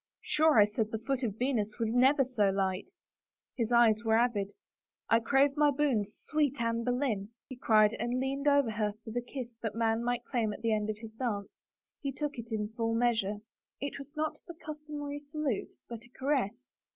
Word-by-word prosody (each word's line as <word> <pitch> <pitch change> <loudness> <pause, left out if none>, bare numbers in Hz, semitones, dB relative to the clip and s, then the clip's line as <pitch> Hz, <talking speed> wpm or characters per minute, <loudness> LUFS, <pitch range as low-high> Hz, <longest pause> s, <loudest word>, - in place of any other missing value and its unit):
" - - -62
Sure, 310 -3 +5
I 205 - +8
said 210 +1 -2
the 220 - -2
foot 260 +4 -2
of 220 -5 -2
Venus 225 -5 -1
was 225 -1 -1
never 265 +3 +5
so 225 -6 +2
light." 190 -1 -1 0.7
His 230 -2 -1
eyes 230 -2 +5
were 220 -1 +3
avid. 220 -5 +1 0.3
" - - -58
I 230 - +6
crave 275 +4 +3
my 295 -1 +4
boon, 270 -7 +1
sweet 285 +6 -1
Anne 230 0 0
Boleyn," 245 -5 -1 0.2
he 260 - -8
cried 215 -3 +4
and 240 +2 -1
leaned 275 +2 -1
over 285 -5 +4
her 210 -1 -1
for 220 - -7
the 245 +2 -1
kiss 245 0 -6
that 220 -2 -3
man 225 0 +1
might 240 0 -1
claim 225 -4 0
at - - -10
the 225 -1 +2
end 210 0 0
of 215 - -2
his 225 0 -9
dance. 220 -4 -3 0.5
He 275 - -2
took 285 -1 -4
it 230 0 -8
in 210 -1 -1
full 225 0 -1
measure. 225 -4 +1 0.4
It 285 0 -4
was 280 0 -10
not 310 0 -1
the 340 - -8
customary 300 -2 -6
salute, 290 -5 -3
but 235 -1 -8
a 240 - -18
caress. 265 -5 0
235 Hz, 205 wpm, -31 LUFS, 220-275 Hz, 0.7 s, I